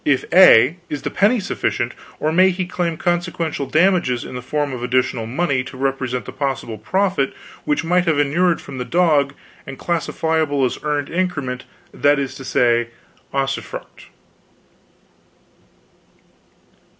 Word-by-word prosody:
If 140 -3 +1
A, 170 -4 +7
is 150 - -4
the - - -3
penny 215 +5 +3
sufficient, 120 - -2 0.3
or 155 - 0
may 185 +3 +5
he 185 0 -2
claim 175 -2 -2
consequential 175 -5 -1
damages 155 -5 +2
in - - -8
the 125 - -5
form 145 +2 -2
of 125 - -5
additional 125 -2 0
money 135 0 0
to 130 - -10
represent 130 -2 -2
the - - -7
possible 135 -6 -3
profit 185 - 0 0.3
which 150 +2 0
might 180 +2 +2
have 160 -3 +2
inured 165 +5 +2
from 130 - -9
the - - -1
dog, 150 -3 +2 0.3
and 135 -1 -7
classifiable 160 -4 0
as 125 - -3
earned 145 -2 -2
increment, 155 -8 -2 0.3
that 145 0 +3
is 140 -1 -2
to 135 - -9
say, 120 -2 +2 0.4
usufruct?" 135 0 -4
145 Hz, 140 wpm, -20 LUFS, 130-175 Hz, 0.4 s, A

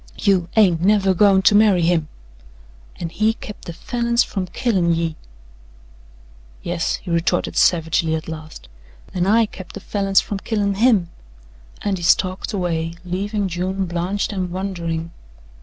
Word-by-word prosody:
"YOU 190 -4 +2
HAIN'T 185 -7 +4
NEVER 195 0 +3
GOIN' 190 0 +4
TO 205 - +5
MARRY 205 -4 +5
HIM." 165 -2 +2 0.9
"An' 170 - -5
he 215 +6 +1
kept 210 - -10
the - - -5
Falins 235 +5 0
from 190 -3 -4
killin' 185 -5 +1
ye." 165 -1 -2 1.5
"Yes," 170 0 -1
he 180 - -8
retorted 170 +1 0
savagely 160 -1 +2
at 160 - -5
last, 155 - -9 0.5
"an' 180 0 0
I 225 +3 +4
kept 190 -3 -11
the - - -7
Falins 195 -1 +1
from 200 - -4
killin' 205 -1 -1
HIM," 200 -5 +2 0.7
and 195 -3 -1
he - - -7
stalked 185 +2 +1
away, 170 -4 -2
leaving 200 +3 -2
June 185 +2 -2
blanched 180 +4 -2
and 185 -2 -2
wondering. 170 -3 -4
185 Hz, 145 wpm, -20 LUFS, 170-205 Hz, 1.5 s, TO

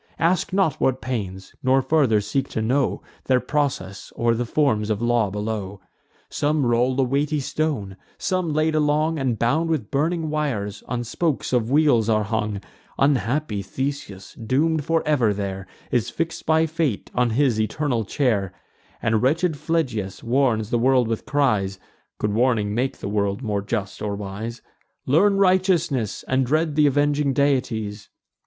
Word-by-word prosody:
Ask 175 +3 +1
not 190 -6 +1
what 130 -1 +2
pains; 95 -7 -5
nor 130 +1 +3
farther 130 -7 +3
seek 135 +7 -2
to 110 - -2
know 130 +4 0 0.2
Their 130 -1 +3
process, 125 -9 -2
or 115 0 +2
the 120 +1 -2
forms 110 -7 +1
of 105 -2 0
law 120 -3 +2
below. 105 -1 -4 0.5
Some 150 -1 0
roll 120 +2 +2
a - - +4
weighty 145 +4 0
stone; 135 -9 -2 0.2
some, 185 -4 -1
laid 155 +1 +1
along, 155 +1 +1
And 130 -4 0
bound 155 +9 +1
with 150 -10 -2
burning 160 +2 0
wires, 115 -10 -2
on 120 -1 -2
spokes 140 +4 -2
of 120 -2 +1
wheels 135 -6 +3
are 110 -1 +3
hung 105 -1 -2 0.4
Unhappy 135 -3 +1
Theseus, 100 -2 -5
doom'd 145 +7 0
for 165 0 +1
ever 120 -9 +2
there, 95 -1 -4 0.2
Is 120 -4 +1
fix'd 165 0 -4
by 160 0 +4
fate 160 -8 -2
on 125 -1 +2
his 115 -2 +2
eternal 120 +2 -1
chair; 105 -6 0 0.5
And 110 -1 +2
wretched 160 +5 +2
Phlegyas 125 - -2
warns 115 -3 +1
the 120 - +2
world 130 -1 +3
with 115 -1 -3
cries 110 -10 +1 0.4
(Could 105 -1 -1
warning 110 -3 +1
make 125 +4 -1
the - - -6
world 100 +2 -1
more 105 -3 -1
just 100 -1 -4
or 105 -1 -2
wise): 105 +4 -6 0.4
'Learn 195 +9 +4
righteousness, 180 - +1
and 130 +1 +2
dread 155 +3 0
th' 150 -1 +5
avenging 145 0 +2
deities. 115 -7 -1
125 Hz, 155 wpm, -23 LUFS, 110-150 Hz, 0.5 s, th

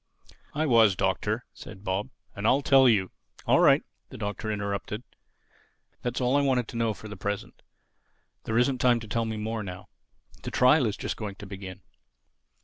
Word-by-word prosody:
"I 155 +1 +1
was, 115 -7 +5
Doctor," - - -1
said 95 - -11
Bob, 95 +5 -2 0.3
"and 100 +2 -1
I 135 - +5
tell 135 -2 +6
you—" 95 -5 +2 0.3
"All - - +4
right," - - +5 0.3
the - - -10
Doctor 110 +1 -3
interrupted, 100 +2 -3 1.0
"that's 120 0 -2
all 125 +1 +2
I 145 - +4
want 130 -4 +1
to - - -9
know 115 -2 0
for 110 - -10
the 105 - -7
present. 100 -1 -5 0.8
There 110 - 0
isn't 125 +1 +2
time 120 -2 +4
to 110 - -9
tell 115 +2 -1
me 110 -1 -3
more 110 +1 -3
now. 90 -3 -8 0.5
The - - -5
trial 130 0 +4
is 105 - -3
just - - -4
going 105 -3 -5
to 100 - -10
begin. 95 -1 -8
110 Hz, 180 wpm, -27 LUFS, 100-125 Hz, 1.0 s, tell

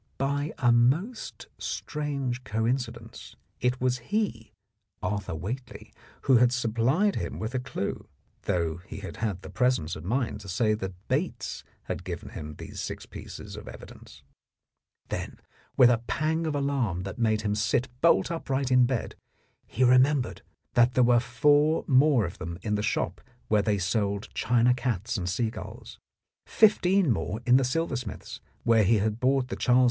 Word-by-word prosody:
By 145 +2 -1
a 120 -3 +3
most 145 - +1
strange 140 -5 -3
coin 110 +4 +1
cidence 115 -2 -9 0.2
it 125 +1 0
was 125 0 +1
he, 205 - -1 0.5
Arthur 100 -2 -2
Whately, 115 - -6 0.3
who 130 -2 +5
had 120 +1 +5
supplied 125 - +1
him - - -4
with 110 +3 -4
a 130 - 0
clue, 125 -6 -4 0.4
though 85 -2 0
he 95 +3 -10
had 95 - -7
had 100 -5 -3
the - - -9
presence 125 - +1
of 80 - -8
mind 115 +1 -1
to 100 - -10
say 110 +4 +2
that 95 -3 -4
Bates 150 +8 -2 0.2
had - - -5
given 90 -2 -6
him 75 0 -7
these - - -9
six - - -5
pieces - - -9
of - - -10
evidence.... - - -12 0.9
Then - - -5 0.4
with 125 -1 +8
a 115 - +2
pang 160 +2 0
of 150 - -1
alarm 135 -11 0
that 95 +4 -7
made 110 -2 +2
him 105 -1 0
sit 110 +4 +1
bolt 170 0 +4
upright 135 -5 -2
in 125 -1 +5
bed, 125 -3 -2 0.5
he 130 - 0
remembered 130 0 +3 0.3
that 120 +1 +4
there 125 - +5
were 120 0 +5
four 145 +7 +3
more 135 -4 +4
of 85 +5 -7
them 85 -2 -5
in 105 - -1
the 105 - +1
shop - - -1 0.3
where 105 -1 +4
they 105 0 +1
sold 100 +1 -1
china 120 +1 +3
cats 120 -4 -2
and 90 -4 -2
seagulls, 110 +4 -4 0.5
fifteen 195 - +4
more 105 0 -2
in 125 +1 +6
the 135 - +2
silversmith's, 130 - -3 0.2
where 115 -2 +4
he 110 +3 +4
had 105 +2 -1
bought 130 0 +2
the - - -3
Charles 125 0 +3
II. - - +6
120 Hz, 165 wpm, -27 LUFS, 105-135 Hz, 0.9 s, with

